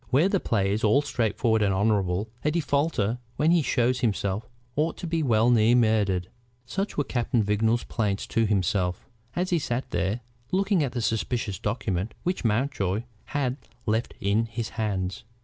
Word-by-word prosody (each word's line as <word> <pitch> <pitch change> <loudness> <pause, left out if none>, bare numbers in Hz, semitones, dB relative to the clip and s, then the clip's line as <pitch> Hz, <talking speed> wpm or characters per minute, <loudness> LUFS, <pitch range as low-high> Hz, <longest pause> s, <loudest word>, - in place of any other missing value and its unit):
Where 150 +9 +4
the 195 - +2
play 100 - +1
is 110 - -2
all 110 +7 +4
straightforward 115 -4 +1
and 100 -2 +3
honorable, 100 -1 +1 0.2
a 150 - +3
defaulter 140 -7 0 0.2
when 155 +2 +3
he 170 -1 +5
shows 125 -2 +1
himself 105 -2 -1 0.3
ought 155 +3 0
to - - -6
be 165 -1 0
well 120 -3 +3
nigh 115 0 +5
murdered." 105 -6 +2 0.4
Such 195 +10 -3
were 145 - +2
Captain 120 -3 0
Vignolles's 110 +3 +1
plaints 105 -3 -1
to 115 -1 +1
himself, 95 -2 0 0.3
as 180 +1 -1
he 170 - +3
sat 125 -2 -3
there 95 +7 -1 0.3
looking 195 -3 +2
at 130 -4 -2
the 120 -3 -2
suspicious 110 -2 -1
document 105 -2 -2
which 180 +1 -1
Mountjoy 110 -3 0 0.2
had 135 -3 -1 0.3
left 110 +2 0
in 105 +4 +1
his 115 0 -4
hands. 100 -2 -2
115 Hz, 165 wpm, -26 LUFS, 105-135 Hz, 0.4 s, he